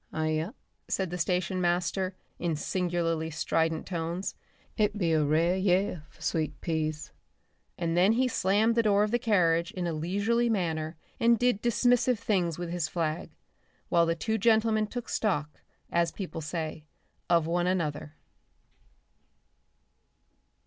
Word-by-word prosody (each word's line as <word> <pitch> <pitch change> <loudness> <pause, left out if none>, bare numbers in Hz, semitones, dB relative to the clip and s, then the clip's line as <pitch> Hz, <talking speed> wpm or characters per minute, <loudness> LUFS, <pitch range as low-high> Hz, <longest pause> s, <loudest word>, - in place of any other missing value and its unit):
"Aye 155 0 -1
ya!" 155 +5 -1 0.4
said 190 -3 -1
the 180 - -3
station 180 +2 0
master 180 +2 0 0.2
in 170 -2 0
singularly 165 -1 -1
strident 160 0 0
tones. 170 +1 -3 0.4
"It 210 -1 +1
be 170 -5 +1
a 155 -1 +3
rare 160 +5 +2
year 185 -3 +1
for - - -16
sweet 160 -2 -1
peas," 155 -2 -2 0.7
and 165 -1 -1
then 185 +5 +5
he 255 +2 +2
slammed 215 0 +2
the 230 - +3
door 205 -2 +3
of 210 - -1
the 240 - +2
carriage 170 -7 +2
in 180 -1 -3
a 170 - -1
leisurely 205 +9 +1
manner 160 -6 -1 0.2
and 235 0 +5
did 245 -3 +1
dismissive 245 +1 +3
things 185 -7 0
with 175 -1 -4
his 175 -3 -1
flag, 160 -1 -2 0.6
while 170 -1 +4
the 165 - +1
two 220 +6 -1
gentlemen 220 0 +3
took 245 +2 -6
stock, 150 -9 -1 0.3
as 170 -1 +2
people 180 -5 -6
say, 155 0 -4 0.4
of 170 -2 +4
one 175 +2 0
another. 155 -4 -2
175 Hz, 145 wpm, -29 LUFS, 165-205 Hz, 0.7 s, then